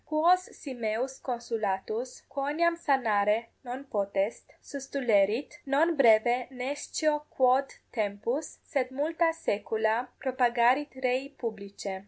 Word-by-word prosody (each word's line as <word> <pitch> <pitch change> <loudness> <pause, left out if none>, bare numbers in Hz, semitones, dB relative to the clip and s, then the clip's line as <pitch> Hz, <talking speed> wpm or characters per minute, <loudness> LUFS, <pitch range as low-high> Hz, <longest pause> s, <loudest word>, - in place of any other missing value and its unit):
Quos 345 +4 +3
si 275 - -8
meus 240 +3 -2
consulatus, 230 -1 -3
quoniam 300 +5 +1
sanare 230 -7 +2
non 255 +2 -6
potest, 200 -4 -2
sustulerit, 260 -2 0
non 315 +5 +3
breve 240 -1 +5
nescio 290 +3 -1
quod 260 +1 +3 0.2
tempus, 220 +6 -2
sed 265 -5 -1
multa 320 +5 +1
saecula 220 -5 0
propagarit 255 +2 +3
rei 255 +2 +1
publicae. 200 -6 -6
255 Hz, 100 wpm, -29 LUFS, 220-280 Hz, 0.2 s, breve